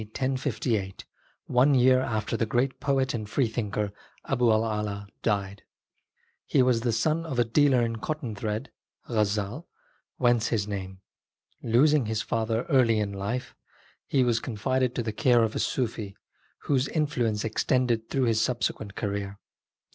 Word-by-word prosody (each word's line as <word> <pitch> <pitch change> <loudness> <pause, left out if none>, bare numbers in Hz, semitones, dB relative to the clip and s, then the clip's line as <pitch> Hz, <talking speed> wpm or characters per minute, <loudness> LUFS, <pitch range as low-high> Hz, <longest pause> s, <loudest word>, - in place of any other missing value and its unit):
d. - - -6
1058, 120 -5 -2 0.4
one 130 +3 +4
year 130 0 +5
after 110 -3 -2
the 115 -1 0
great 125 +4 0
poet 135 -1 +1
and 110 -3 -4
freethinker 105 -4 -1 0.3
Abu' 125 -3 +1
1' 110 -1 +2
Ala 100 -1 -4
died. 100 -2 -1 0.9
He 135 - +4
was 125 -2 +2
the 120 0 +1
son 155 +9 +1
of 155 -6 -5
a 120 - +5
dealer 130 +1 +3
in 115 -1 -2
cotton 145 -1 -4
thread 105 +1 -4 0.4
(Gazzal), 105 - -1 0.5
whence 120 -3 +3
his 105 -3 -1
name. 95 -2 -6 0.6
Losing 130 +3 +3
his 110 -1 -1
father 115 0 -1
in 140 - -2
early 115 -5 +4
life, 100 +5 -4 0.5
he 135 -2 +2
was 120 -2 +2
confided 125 +2 -1
to 120 - -1
the 110 -1 -3
care 120 +1 +4
of 110 -1 -1
a - - -1
Sufi, 110 -5 -2 0.5
whose 135 -2 +1
in 155 -2 +1
fluence 115 -8 -1
extended 115 0 0
through 135 - 0
his 115 -2 +2
subsequent 110 -4 -2
career. 100 -1 -3
115 Hz, 155 wpm, -27 LUFS, 105-130 Hz, 0.9 s, year